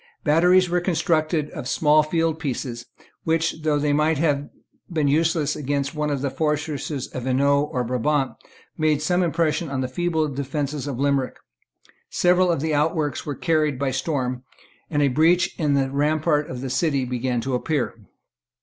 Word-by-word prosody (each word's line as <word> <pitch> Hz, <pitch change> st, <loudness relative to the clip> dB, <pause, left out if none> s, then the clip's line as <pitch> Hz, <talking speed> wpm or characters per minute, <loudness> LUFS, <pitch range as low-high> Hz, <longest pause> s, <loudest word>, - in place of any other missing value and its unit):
Batteries 180 Hz, +4 st, +4 dB
were 175 Hz, 0 st, 0 dB
constructed 160 Hz, -3 st, 0 dB
of 125 Hz, -, -6 dB
small 150 Hz, +2 st, +4 dB
field 160 Hz, +1 st, 0 dB
pieces, 125 Hz, -5 st, -4 dB, 0.4 s
which, 160 Hz, 0 st, 0 dB
though 155 Hz, -1 st, +1 dB
they 145 Hz, 0 st, +1 dB
might 155 Hz, +1 st, +2 dB
have 145 Hz, -2 st, 0 dB, 0.4 s
been 155 Hz, -4 st, +1 dB
useless 155 Hz, 0 st, +1 dB
against 140 Hz, 0 st, -2 dB
one 150 Hz, -1 st, -1 dB
of 140 Hz, -2 st, -2 dB
the 140 Hz, -, -1 dB
fortresses 150 Hz, -2 st, -2 dB
of 130 Hz, -1 st, -6 dB
Hainault 140 Hz, +3 st, +2 dB
or 125 Hz, -, -1 dB
Brabant, 130 Hz, +3 st, 0 dB, 0.5 s
made 155 Hz, -1 st, +2 dB
some 180 Hz, +2 st, +2 dB
impression 165 Hz, -2 st, 0 dB
on 135 Hz, -1 st, -2 dB
the 130 Hz, -, -1 dB
feeble 160 Hz, +3 st, 0 dB
defences 140 Hz, +1 st, -3 dB
of 135 Hz, -4 st, -4 dB
Limerick. 140 Hz, -1 st, 0 dB, 0.7 s
Several 180 Hz, +1 st, +3 dB, 0.2 s
outworks 150 Hz, 0 st, 0 dB
were 145 Hz, -, -2 dB
carried 155 Hz, -4 st, +1 dB
by 135 Hz, 0 st, -1 dB
storm; 130 Hz, -2 st, -2 dB, 0.5 s
and 145 Hz, -2 st, +1 dB
a -, -, +4 dB
breach 160 Hz, +7 st, +3 dB
in 150 Hz, -3 st, +2 dB
the 135 Hz, -1 st, +1 dB
rampart 150 Hz, +1 st, +1 dB
of 125 Hz, -1 st, -6 dB
the 130 Hz, -1 st, -4 dB
city 135 Hz, -1 st, +1 dB
began 125 Hz, 0 st, -1 dB
to 130 Hz, +2 st, -3 dB
appear. 140 Hz, +1 st, -1 dB
150 Hz, 160 wpm, -23 LUFS, 135-160 Hz, 0.7 s, Batteries